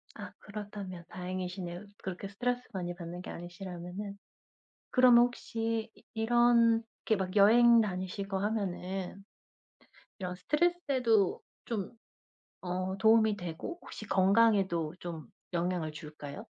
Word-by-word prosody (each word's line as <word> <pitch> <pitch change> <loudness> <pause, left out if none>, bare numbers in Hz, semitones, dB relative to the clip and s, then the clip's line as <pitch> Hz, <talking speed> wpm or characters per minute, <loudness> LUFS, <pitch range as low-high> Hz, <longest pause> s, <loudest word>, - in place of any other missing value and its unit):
아 - - -8
그렇다면 200 -4 -7
다행이시네요 180 0 -5 0.2
그렇게 190 +1 -4
스트레스 245 +5 -1
많이 175 -2 -3
받는 175 0 -7
게 - - -9
아니시라면은. 180 +3 -7 0.7
그러면 245 -2 +7
혹시 230 -2 -2
이 - - -21
이렇게 230 -1 +3
막 190 +1 -3
여행 235 +3 +7
다니시고 195 -1 -2
하면은 195 -2 -3 1.0
이런 180 -2 -3
스트레스에도 265 - +2 0.2
좀 210 -5 -3 0.7
어 185 +1 -2
도움이 220 +1 +4
되고 175 - -6
혹시 215 - -9
건강에도 190 -5 +3
좀 165 -4 -6 0.3
영향을 175 -2 -1
줄까요? 150 -2 -8
195 Hz, 275 characters per minute, -31 LUFS, 180-225 Hz, 1.0 s, 그러면